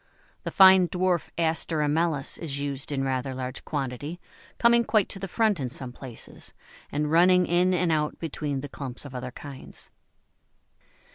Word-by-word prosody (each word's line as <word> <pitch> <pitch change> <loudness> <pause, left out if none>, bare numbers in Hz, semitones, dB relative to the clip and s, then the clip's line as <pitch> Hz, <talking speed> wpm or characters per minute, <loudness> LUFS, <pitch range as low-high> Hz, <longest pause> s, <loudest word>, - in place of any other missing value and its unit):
The - - -1
fine 190 -2 +7
dwarf 180 -3 0
Aster 165 0 0
amellus 150 -1 0
is 140 -4 -3
used 140 0 -3
in 135 -1 -1
rather 130 0 -2
large 130 0 -5
quantity, 145 +3 -4 0.4
coming 235 0 +5
quite 215 -3 +2
to 195 - -5
the 195 - -4
front 215 -1 +1
in 130 -3 -2
some 125 0 -4
places, 125 -2 -10 0.4
and 150 +1 -1
running 180 +2 +5
in 175 +2 +2
and 180 -2 +1
out 150 -1 0
between 145 -4 -3
the 145 - -6
clumps 135 -2 -6
of 140 - -9
other 125 0 -5
kinds. 135 +1 -10
150 Hz, 160 wpm, -26 LUFS, 135-180 Hz, 0.4 s, fine